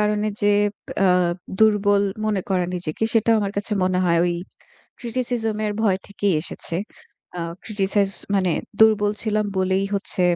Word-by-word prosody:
কারণে 210 0 +1 0.2
যে, 205 - +4 0.6
আ - - +5 0.5
দুর্বল 205 -2 +4 0.2
মনে 210 -3 +1
করা 185 -2 +2
নিজেকে, 175 +1 -5
সেটাও 225 0 +4
আমার 200 -1 -2
কাছে 205 +1 -2
মনে 185 0 +1
হয় 170 -1 +3
ওই 175 -1 0 0.6
criticism 235 -2 -2
এর 210 - -1
ভয় 195 -4 +2
থেকেই 200 -2 0
এসেছে। 170 - -4 0.6
আ - - -2 0.2
criticize 200 -1 0 0.2
মানে 185 -2 +2 0.3
দুর্বল 210 -2 +5
ছিলাম 215 -1 0
বলেই 190 +1 +1
হচ্ছে 195 -2 -1
205 Hz, 145 wpm, -22 LUFS, 190-215 Hz, 0.6 s, আ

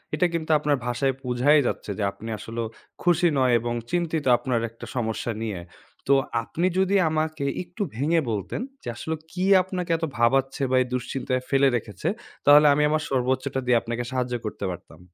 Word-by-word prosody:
এটা 180 - +2
কিন্তু 160 -1 -2
আপনার 145 -1 +1
ভাষায় 130 +2 0
বুঝাই 130 +4 +4
যাচ্ছে, - - -3
যে 105 - -1
আপনি 110 +3 -9
আসলেও 115 +1 -4 0.4
খুশি 175 0 +4
নয় 130 -2 +3
এবং 120 +1 -3 0.2
চিন্তিত 165 -3 -1
আপনার 120 -1 -1
একটা 115 - -11
সমস্যা 115 -1 -2
নিয়ে। 105 -5 -3 0.5
তো 140 - +5 0.3
আপনি 170 +9 -1
যদি 190 +1 +2
আমাকে 155 -2 -1 0.2
একটু 180 +4 -5
ভেঙে 160 +7 +2
বলতেন 105 - -3 0.2
যে - - -10
আসলে 160 +6 -3 0.2
কি 185 +1 -2 0.2
আপনাকে 180 -2 -4
এত 165 - -2
ভাবাচ্ছে, 135 +3 +2
বা - - +3
এই 125 - -1
দুশ্চিন্তায় 130 +1 -2
ফেলে 135 0 +4
রেখেছে? 105 -5 -6 0.4
তাহলে 145 +1 +8
আমি 150 +1 +2
আমার 155 0 +1
সর্বোচ্চটা 130 0 0
দিয়ে 125 -1 +4
আপনাকে 120 +1 -3
সাহায্য 125 -1 -1
করতে 105 -1 -4
পারতাম। 85 -2 -11
130 Hz, 175 wpm, -25 LUFS, 120-155 Hz, 0.5 s, তাহলে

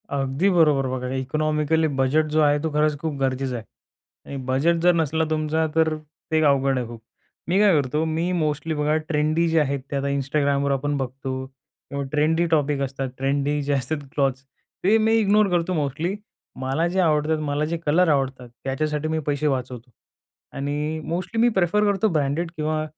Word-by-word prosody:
अगदी 140 +6 0
बरोबर, 150 -7 +3
बघा 125 0 -3
इकॉनॉमिकली 155 +4 0
बजेट 150 +4 +2
जो 155 +1 +3
आहे, 145 -1 +3
तो 160 - -1
खरंच 150 0 +2
खूप 155 -1 -3
गरजेचं 130 -1 -1
आहे 115 - -5 0.6
आणि 140 - -6
बजेट 135 +7 +2
जर 175 +1 +5
नसला 160 0 +1
तुमचा 155 0 0
तर 160 -1 +3 0.4
ते 160 0 +3
अवघड 135 -2 +3
आहे 120 - -4
खूप. 115 -1 -10 0.5
मी 180 +3 +2
काय 205 -1 +6
करतो 150 +4 -1
मी 165 +3 -1
मोस्टली 155 -2 -1
बघा 150 +1 +1
ट्रेंडी 155 +2 +1
जे 165 0 +3
आहेत 140 -2 0
ते - - -2
आता 140 0 -1
Instagramवर 140 0 0
आपण 145 +1 0
बघतो 130 0 -4
किंवा 135 +1 -9
ट्रेंडी 155 +3 +2
टॉपिक 145 -3 +1
असतात 135 0 -3
ट्रेंडी 140 +2 0
जे 145 +1 0
असतात 140 +3 -1 0.2
क्लॉथ्स. 135 -2 0 0.4
ते 205 +4 +5
मी 220 0 +3
इग्नोर 210 0 +4
करतो 175 0 0
मोस्टली. 155 +4 -1 0.4
मला 135 +6 0
जे 190 - +1
आवडतात 155 -2 +2
मला 150 0 -1
जे 170 +2 -2
कलर 170 +5 +3
आवडतात 130 -4 -1
त्याच्यासाठी 150 +3 -1
मी 160 0 -1
पैसे 145 +1 0
वाचवतो 125 -3 -3 0.7
आणि 150 +3 -2
मोस्टली 185 +7 -2
मी 240 - +5
प्रेफर 190 +3 +2
करतो 205 +1 +2
ब्रँडेड 150 +3 0
किंवा 155 0 -1
150 Hz, 175 wpm, -23 LUFS, 135-160 Hz, 0.7 s, काय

